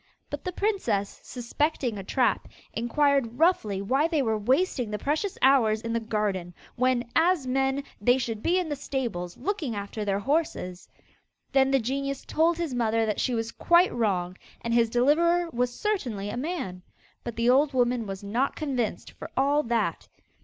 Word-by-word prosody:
But - - -5
the 365 - -3
princess, 345 - -1
suspecting 250 0 -2
a 195 - -6
trap, 235 +1 +1 0.3
inquired 245 +1 +1
roughly 220 - +2
why 270 +9 +2
they 315 -4 +1
were 220 -2 +1
wasting 250 - +1
the 210 - -2
precious 310 - -1
hours 240 -5 +5
in 230 0 -3
the 230 - +1
garden, 205 -6 -2 0.2
when, 255 -1 +1
as 335 -3 +3
men, 270 +2 0 0.2
they 245 +4 +4
should 230 -4 -3
be 350 +8 +2
in 365 -2 0
the 295 - -2
stables 235 -11 -4
looking 350 - -2
after 205 +1 -4
their 200 -1 0
horses. 205 - -2 0.6
Then 270 -1 +4
the 270 - +4
genius 275 +3 -3
told 330 +2 +2
his 335 -6 -2
mother 225 -2 +1
that 210 -1 -1
she 250 - 0
was 225 0 -2
quite 345 +2 +3
wrong, 185 -6 -1 0.2
and 230 - -2
his 235 -1 +4
deliverer 330 +8 +3
was 245 +1 0
certainly 245 - -2
a - - -5
man. 250 - -4 0.4
But 235 - -5
the 235 +1 +3
old 280 +3 +4
woman 245 -3 +1
was 195 0 -6
not 235 +7 0
convinced 260 -7 -2
for - - -9
all 285 +2 +3
that. 235 -4 -1
245 Hz, 175 wpm, -27 LUFS, 220-290 Hz, 0.6 s, hours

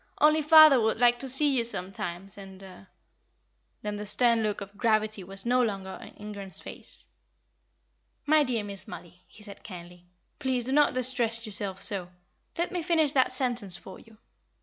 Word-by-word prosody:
Only 305 +1 +4
father 305 -4 +8
would 220 0 +1
like 240 0 +3
to 270 - -5
see 275 +2 +3
you 240 - +2
sometimes 190 -3 -5
and 195 -1 -12 0.7
" - - -46
Then 210 0 -3
the 210 - -6
stern 235 +2 +3
look 210 -2 -1
of 200 0 -10
gravity 215 -2 0
was 195 +3 -8
no 250 +1 +3
longer 195 -5 -3
on - - -10
Ingram's 200 -2 -8
face. - - -8 1.2
"My 305 0 +4
dear 240 -5 -1
Miss 200 -1 -8
Mollie," 175 +1 -11
he 215 - -17
said, 200 -2 -10
kindly, 175 -2 -11 0.3
"please 260 -4 -1
do 260 - -2
not 295 -1 +3
distress 240 -2 +2
yourself 195 -2 -3
so. 185 -4 -3 0.5
Let 345 - -1
me 360 -2 -2
finish 320 -4 +1
that 260 -2 +3
sentence 245 -8 -2
for 185 +2 -12
you. 225 -1 -19
220 Hz, 170 wpm, -27 LUFS, 195-255 Hz, 1.2 s, father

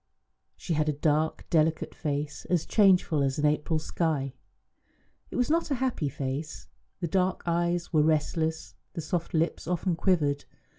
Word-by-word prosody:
She 170 - -3
had 155 0 +1
a - - +1
dark, 155 +2 0
delicate 160 -1 +2
face, 145 0 -3
as 175 -3 0
changeful 185 -7 +4
as 135 -1 0
an 150 - +1
April 150 +2 +1
sky. 155 -4 -1 1.0
It - - -8
was 250 +3 +1
not 330 0 +1
a 280 - +1
happy 250 - -1
face; 140 +3 -4 0.4
the 170 - 0
dark 185 +2 0
eyes 175 0 0
were 155 - +5
restless, 160 +1 0 0.2
the 170 - -4
soft 170 +2 -2
lips 160 0 0
often 180 0 0
quivered. 155 -5 +1
160 Hz, 155 wpm, -28 LUFS, 150-175 Hz, 1.0 s, were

